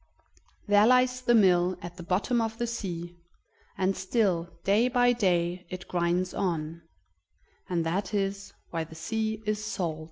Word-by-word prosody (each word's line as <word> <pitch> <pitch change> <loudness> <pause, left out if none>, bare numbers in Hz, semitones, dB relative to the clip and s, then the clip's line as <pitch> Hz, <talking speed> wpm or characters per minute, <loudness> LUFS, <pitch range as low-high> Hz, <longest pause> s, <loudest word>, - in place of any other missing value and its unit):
There 205 +1 +5
lies 250 0 +3
the 240 -1 +3
mill 180 -3 +4
at 175 0 -8
the - - -7
bottom 200 +7 0
of 225 0 -3
the 240 - -1
sea, 175 -7 -5 0.6
and 190 +1 +1
still, 185 -3 0
day 210 +5 +3
by 245 -1 +3
day, 180 -5 0
it 185 0 -7
grinds 175 +1 0
on; 165 -3 -2 0.9
and 170 -2 0
that 190 +6 -1
is 195 -1 -2 0.2
why 165 -1 -1
the 160 0 -12
sea 220 +5 -3
is 215 0 -1
salt. 170 -7 -3
190 Hz, 155 wpm, -28 LUFS, 175-220 Hz, 0.9 s, There